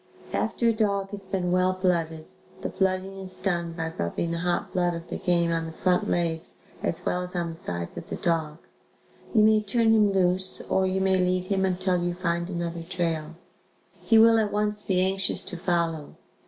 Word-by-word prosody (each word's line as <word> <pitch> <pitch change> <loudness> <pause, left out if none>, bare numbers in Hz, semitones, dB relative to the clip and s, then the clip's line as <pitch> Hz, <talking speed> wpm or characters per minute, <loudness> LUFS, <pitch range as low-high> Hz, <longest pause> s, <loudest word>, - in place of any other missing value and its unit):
After 235 - 0
a - - +3
dog 200 -3 0
has 200 -2 -6
been 185 -2 -1
well 185 +1 +3
blooded 170 -4 -1 0.4
(the - - -2
blooding 190 0 -1
is 185 -1 -4
done 170 -3 -1
by 165 -1 -4
rubbing 85 - -2
the 170 - -2
hot 175 0 -1
blood 175 -1 +1
of 165 0 -7
the - - -3
game 170 -1 +1
on 165 0 -1
the - - -6
front 180 +2 +1
legs, 165 -1 -1 0.3
as 165 - -3
well 180 - 0
as 180 0 -7
on 170 -1 -1
the 165 - -7
sides 85 - -4
of - - -7
the - - -3
dog), 160 -3 -1 0.8
you 215 - +6
may 215 0 +5
turn 225 +2 +2
him 210 -2 +4
loose 185 0 +1
or 190 0 +1
you 190 0 0
may 190 0 +3
lead 180 0 +1
him 190 -1 +2
until 185 -1 0
you 175 0 -1
find 170 -1 -1
another 170 -2 -3
trail. 165 -2 -3 0.7
He 225 - +4
will 225 0 +7
at 210 -2 0
once 210 0 0
be 185 -3 +1
anxious 195 0 0
to - - -6
follow. 170 -3 -1
180 Hz, 200 wpm, -26 LUFS, 170-195 Hz, 0.8 s, will